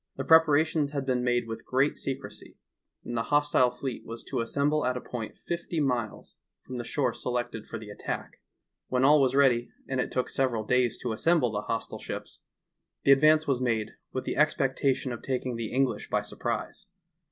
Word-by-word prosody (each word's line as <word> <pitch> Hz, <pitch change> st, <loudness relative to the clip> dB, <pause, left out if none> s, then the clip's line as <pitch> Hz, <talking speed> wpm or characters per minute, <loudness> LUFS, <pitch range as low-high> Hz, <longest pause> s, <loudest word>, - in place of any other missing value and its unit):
The -, -, -3 dB
preparations 160 Hz, -2 st, +4 dB
had 140 Hz, -2 st, -2 dB
been 125 Hz, -2 st, 0 dB
made 120 Hz, -1 st, +1 dB
with 115 Hz, 0 st, -6 dB
great 135 Hz, +3 st, +1 dB
secrecy, 135 Hz, 0 st, -6 dB, 0.5 s
and 120 Hz, -, -4 dB
the 115 Hz, -, +1 dB
hostile 145 Hz, -3 st, +4 dB
fleet 125 Hz, 0 st, -5 dB
was 115 Hz, +1 st, -7 dB
to -, -, -5 dB
assem 140 Hz, +5 st, +1 dB
ble 155 Hz, 0 st, +1 dB
at 125 Hz, 0 st, 0 dB
a -, -, -2 dB
point 120 Hz, -3 st, -6 dB
fifty 170 Hz, -1 st, -3 dB
miles 125 Hz, -7 st, -2 dB, 0.3 s
from 125 Hz, -1 st, -6 dB
the -, -, -3 dB
shore 125 Hz, 0 st, 0 dB
selected 120 Hz, -3 st, -3 dB
for 115 Hz, -, -5 dB
the 105 Hz, -2 st, -9 dB
attack. -, -, -6 dB, 0.5 s
When 130 Hz, 0 st, +1 dB
all 150 Hz, +1 st, +6 dB
was 130 Hz, -1 st, +2 dB
ready, 125 Hz, -4 st, +4 dB, 0.2 s
and 130 Hz, -1 st, 0 dB
it -, -, -4 dB
took 125 Hz, -, -1 dB
several 125 Hz, -5 st, 0 dB
days 125 Hz, -1 st, +2 dB
to 120 Hz, -, -1 dB
assemble 155 Hz, 0 st, +2 dB
the 105 Hz, -1 st, -2 dB
hostile 115 Hz, +1 st, -4 dB
ships, -, -, -7 dB, 0.6 s
the 140 Hz, -, +5 dB
advance 155 Hz, +3 st, +6 dB
was 130 Hz, -3 st, +1 dB
made 115 Hz, -4 st, 0 dB, 0.2 s
with 130 Hz, -, -3 dB
the -, -, -3 dB
expectation 135 Hz, -3 st, +1 dB
of 120 Hz, -, -6 dB
taking 130 Hz, -2 st, -2 dB
the 115 Hz, -1 st, -4 dB
English 135 Hz, 0 st, 0 dB
by -, -, +1 dB
surprise. -, -, -4 dB
130 Hz, 190 wpm, -28 LUFS, 120-140 Hz, 0.6 s, all